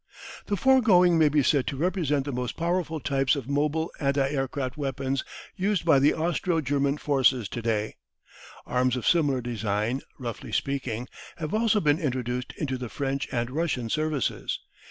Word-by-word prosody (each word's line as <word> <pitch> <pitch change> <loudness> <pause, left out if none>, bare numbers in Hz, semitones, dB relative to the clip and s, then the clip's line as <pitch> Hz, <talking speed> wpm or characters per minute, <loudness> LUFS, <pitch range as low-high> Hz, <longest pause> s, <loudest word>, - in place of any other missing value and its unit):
The 205 - 0
foregoing 185 -9 +5
may 155 -2 +5
be 145 -1 +2
said 140 -1 +2
to 140 - -2
represent 150 -4 0
the 145 - -3
most 125 -1 -3
powerful 170 -1 -1
types 135 +1 +1
of 135 -4 -5
mobile 150 +3 0
anti 140 -1 +1
aircraft 135 -2 -2
weapons 135 -1 -2 0.3
used 195 -2 0
by 160 -5 +5
the 140 +2 +4
Austro 170 +1 0
German 140 0 0
forces 130 -6 +2
to 120 - -5
day. 110 -2 -1 0.7
Arms 125 0 +1
of 125 - -4
similar 145 -7 +3
design, 115 +1 -1 0.2
roughly 120 -5 -6
speaking, 130 -4 -2 0.3
have 155 0 -4
also 220 0 +3
been 150 -3 +2
introduced 125 -4 -2
into 130 -4 -2
the 125 -2 -5
French 135 +4 -2
and 120 -1 -1
Russian 135 -6 -1
services. 155 -3 -1
140 Hz, 160 wpm, -26 LUFS, 125-160 Hz, 0.7 s, foregoing